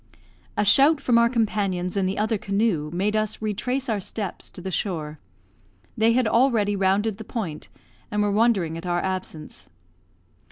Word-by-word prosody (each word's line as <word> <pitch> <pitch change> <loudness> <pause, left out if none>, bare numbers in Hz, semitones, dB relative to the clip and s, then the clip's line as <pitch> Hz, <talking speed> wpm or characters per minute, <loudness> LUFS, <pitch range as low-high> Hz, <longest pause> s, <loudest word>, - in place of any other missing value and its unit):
A 210 - +2
shout 275 +9 +5
from 245 -4 +3
our 235 0 +4
companions 205 -6 -1
in 195 -2 +1
the 190 - -2
other 215 0 0
canoe 200 -6 0
made 195 +5 0
us 215 -1 -1
retrace 250 +6 -2
our 220 -3 0
steps 200 0 -5
to - - -12
the 190 +1 -5
shore. 155 -6 -3 0.8
They 225 +1 +3
had 250 -1 +2
already 225 -4 +2
rounded 195 +2 +1
the - - -6
point, 195 -10 -5 0.4
and 210 0 0
were 205 - +1
wondering 200 -7 +2
at 175 - -8
our 175 0 0
absence. 185 - -5
205 Hz, 165 wpm, -24 LUFS, 185-225 Hz, 0.8 s, shout